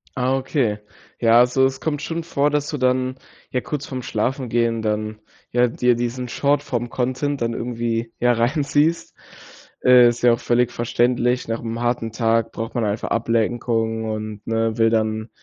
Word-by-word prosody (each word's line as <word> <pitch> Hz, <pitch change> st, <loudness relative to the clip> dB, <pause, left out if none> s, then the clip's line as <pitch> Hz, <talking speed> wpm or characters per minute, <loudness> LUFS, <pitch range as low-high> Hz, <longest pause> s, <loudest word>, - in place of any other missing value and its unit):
Ah, 130 Hz, +1 st, +1 dB
okay. 130 Hz, -6 st, -1 dB, 0.4 s
Ja, 115 Hz, 0 st, +5 dB
also, 125 Hz, +2 st, +4 dB
es 135 Hz, 0 st, -1 dB
kommt 150 Hz, -2 st, -2 dB
schon 165 Hz, +1 st, -3 dB
vor, 145 Hz, -3 st, +1 dB
dass 145 Hz, 0 st, -1 dB
du 150 Hz, -, -3 dB
dann, 130 Hz, 0 st, +1 dB, 0.4 s
ja, 125 Hz, -, 0 dB
kurz 145 Hz, -2 st, -4 dB
vorm 130 Hz, -2 st, -5 dB
Schlafengehen, 115 Hz, -1 st, -1 dB
dann, 110 Hz, 0 st, -2 dB, 0.3 s
ja, 125 Hz, 0 st, +3 dB
dir 120 Hz, +1 st, +2 dB
diesen 120 Hz, +1 st, -3 dB
Shortform 125 Hz, -4 st, 0 dB
Content 130 Hz, +3 st, -2 dB
dann 115 Hz, 0 st, 0 dB
irgendwie, 115 Hz, -1 st, -3 dB
ja, 120 Hz, 0 st, +3 dB
reinziehst? 145 Hz, +6 st, +1 dB, 0.7 s
Äh, 125 Hz, -1 st, +7 dB
ist 120 Hz, +1 st, -4 dB
ja 120 Hz, -1 st, +6 dB
auch 115 Hz, -, -2 dB
völlig 120 Hz, 0 st, +1 dB
verständlich. 120 Hz, +1 st, 0 dB
Nach 115 Hz, 0 st, -3 dB
'nem 115 Hz, 0 st, -4 dB
harten 120 Hz, -2 st, -1 dB
Tag 115 Hz, -1 st, +1 dB
braucht 115 Hz, 0 st, -5 dB
man 120 Hz, -, 0 dB
einfach 105 Hz, +2 st, -2 dB
Ablenkung 115 Hz, 0 st, 0 dB
und, 110 Hz, -1 st, -5 dB
ne, 115 Hz, 0 st, 0 dB
will 115 Hz, 0 st, +4 dB
dann, 110 Hz, 0 st, -1 dB
120 Hz, 165 wpm, -21 LUFS, 115-130 Hz, 0.7 s, Äh